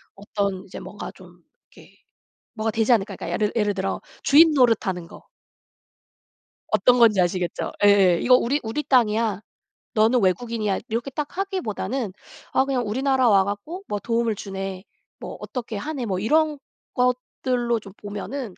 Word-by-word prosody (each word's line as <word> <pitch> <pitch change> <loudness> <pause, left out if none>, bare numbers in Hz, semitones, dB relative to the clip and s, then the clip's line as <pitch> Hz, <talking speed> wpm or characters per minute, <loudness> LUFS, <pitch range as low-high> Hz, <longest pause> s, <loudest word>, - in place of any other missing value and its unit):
어떤 200 -1 -3
이제 195 - -9
뭔가 - - -8
좀 - - -17 0.3
이렇게 - - -18 0.6
뭐가 225 -1 -1
되지 225 +2 +2
않을까? 200 -3 +1
그러니까 - - -7
약간 170 - -4 0.2
예를 - - -9
예를 210 -2 +1
들어 195 +1 -2 0.2
주인 315 +3 +6
노릇 240 -7 +3
하는 180 -3 -3
거. - - -14 1.5
어떤 240 +4 +4
건지 215 -5 +5
아시겠죠? 175 0 -1
예예. 195 -4 +5
"이거 250 0 +6
우리 260 +4 +1
우리 225 +7 -3
땅이야. 225 -6 +2 0.5
너는 225 +3 +4
외국인이야." 210 +2 0
이렇게 235 +4 -2
딱 295 +4 -5
하기보다는 265 - -3 0.4
아 265 - +3
그냥 260 -4 -1
"우리나라 260 +3 +2
와 195 -3 +5
갖고 205 - -5
뭐 205 - -2
도움을 230 +1 0
주네. 195 -1 -6 0.3
뭐 - - -7
어떻게 235 -4 -5
하네." 275 +2 -4
뭐 190 -3 -1
이런 300 +8 +2 0.4
것들로 250 -1 0
좀 195 -2 -12
보면은 210 +2 -6
225 Hz, 335 characters per minute, -23 LUFS, 200-255 Hz, 1.5 s, 주인